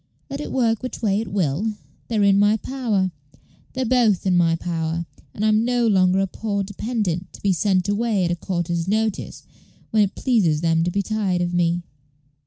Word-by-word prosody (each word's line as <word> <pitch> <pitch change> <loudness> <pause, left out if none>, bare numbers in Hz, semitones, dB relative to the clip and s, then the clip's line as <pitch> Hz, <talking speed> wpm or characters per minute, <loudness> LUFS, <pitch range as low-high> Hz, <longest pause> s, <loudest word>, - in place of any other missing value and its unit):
Let 280 +1 -4
it - - -6
work 230 -4 +1
which 255 -2 -6
way 200 -1 +2
it 225 - -6
will, 190 +3 0 0.3
they're 220 -3 +1
in 200 0 +5
my 205 +2 +4
power 220 -7 -1 0.6
they're 260 0 -1
both 225 -6 +2
in 185 -1 +3
my 165 -2 +3
power; 165 0 -3 0.3
and 210 - -3
I'm 215 +1 +3
no 245 0 +1
longer 190 -3 +3
a - - +2
poor 200 +1 -3
dependent, 200 -3 -3
to - - -12
be 200 -2 +3
sent 185 0 +1
away, 205 -2 +1
at 170 - 0
a - - +1
quarter's 175 -1 -2
notice, 220 +1 -1 0.5
when 220 - +4
it 200 -2 +1
pleases 190 - +2
them 165 -1 +2
to - - +1
be 200 +3 -1
tired 195 -4 -1
of 175 0 -2
me." 175 0 +1
200 Hz, 195 wpm, -22 LUFS, 175-220 Hz, 0.6 s, in